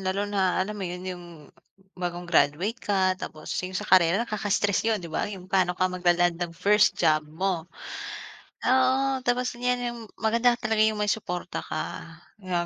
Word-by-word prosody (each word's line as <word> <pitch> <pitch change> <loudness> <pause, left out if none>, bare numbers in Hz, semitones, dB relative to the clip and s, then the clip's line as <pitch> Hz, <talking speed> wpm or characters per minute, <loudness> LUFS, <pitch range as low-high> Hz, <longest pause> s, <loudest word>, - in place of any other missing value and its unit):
Lalo 190 +2 -1
na 195 -3 +1
alam 190 +3 0
mo 210 - -8
yun, 180 +1 -6
yung 180 -2 -6 0.8
bagong 175 0 -3
graduate 170 - +1
ka 190 -3 +2
tapos 155 0 -6
yung 185 0 -4
sa - - -3
karera, 185 +4 +4
nakaka-stress 205 -1 0
yun 225 - +2
diba? 170 -3 -3
Yung 195 -3 -8
pano 180 -2 +2
ka 185 - +1
magla-land 175 -1 +2
ng 170 -1 -4
first 210 +4 +4
job 155 0 +3
mo. 175 +1 -2 1.0
Oo, 260 +1 +3
tapos 250 0 0
ngayon, 245 +1 0
yung 235 - -9 0.2
maganda 235 +2 +2
talaga 220 -2 0
yung 215 -1 +3
may 210 - 0
suporta 180 -4 -3
ka, 155 - -4 0.4
yung 180 -2 -1
190 Hz, 165 wpm, -26 LUFS, 175-220 Hz, 1.0 s, karera